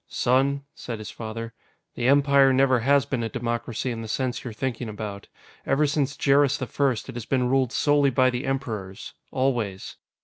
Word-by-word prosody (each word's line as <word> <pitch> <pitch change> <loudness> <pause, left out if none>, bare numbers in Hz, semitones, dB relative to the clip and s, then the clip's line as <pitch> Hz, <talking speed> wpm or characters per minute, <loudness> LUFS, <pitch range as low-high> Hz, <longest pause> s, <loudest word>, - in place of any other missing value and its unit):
"Son," 135 +3 +1
said 120 -7 -6
his 110 -1 -8
father, 115 +1 -6 0.4
"the 120 - -1
Empire 140 0 +5
never 130 -1 +3
has 140 +3 +3
been 130 -3 -2
a 115 - -2
democracy 120 +1 -3
in 115 -1 -5
the 110 - -6
sense 125 +3 -2
you're 125 - -5
thinking 120 +1 -4
about. 105 -1 -6 0.4
Ever 145 +3 +2
since 140 -1 -1
Jerris 140 0 +3
the 130 - -3
First, 130 -1 -1
it 130 - -8
has 120 -1 -6
been 130 -2 +1
ruled 130 -2 +2
solely 145 -1 +3
by 130 0 +3
the 125 +1 -4
Emperors. 110 -8 -4 0.2
Always. 120 -8 -2
130 Hz, 180 wpm, -25 LUFS, 115-135 Hz, 0.4 s, Empire